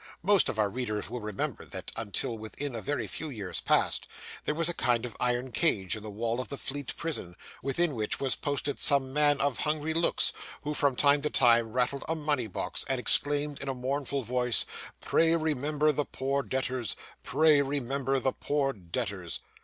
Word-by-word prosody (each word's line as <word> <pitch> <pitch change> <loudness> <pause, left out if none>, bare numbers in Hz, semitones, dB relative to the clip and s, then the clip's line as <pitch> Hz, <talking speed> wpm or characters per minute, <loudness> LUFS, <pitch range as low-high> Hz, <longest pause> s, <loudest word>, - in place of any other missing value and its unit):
Most 200 +1 +6
of - - -3
our 105 -1 +3
readers 110 -3 -3
will 125 - -4
remember, 105 -2 -3
that, - - -6
until 115 +1 -1
within 115 +6 -5
a 115 - -4
very 135 -4 -2
few 155 +10 -5
years 105 -8 -4
past, - - +2 0.4
there 150 - 0
was 165 0 +3
a 175 - +2
kind 120 -6 +1
of 120 - -7
iron 125 +1 0
cage 110 - +2
in 110 - -7
the 105 - -7
wall 115 +4 -2
of - - -7
the 140 - -5
Fleet 140 0 -5
Prison, 145 - -3 0.3
within 155 +3 +1
which 110 -4 0
was 135 -2 +1
posted 145 0 -2
some 135 -2 +4
man 145 -1 +3
of 140 -3 0
hungry 155 +1 -1
looks, 165 +1 +2 0.3
who, 150 - -2
from 140 -3 +2
time 145 +2 +4
to 150 - -1
time, 115 -4 +4
rattled 130 +2 0
a 165 - +1
money 145 -6 -1
box, 95 - -2
and 135 -1 0
exclaimed 145 +3 +3
in 140 - -4
a 135 - -2
mournful 135 +2 -1
voice, 125 0 +1 0.4
'Pray, 165 0 +3
remember 150 -1 +1
the 145 0 -1
poor 140 +1 -1
debtors; 130 0 -1 0.3
pray 155 -2 +4
remember 135 -1 -1
the 130 +1 0
poor 140 -2 -1
debtors. 90 -5 -4
135 Hz, 190 wpm, -29 LUFS, 120-145 Hz, 0.4 s, Most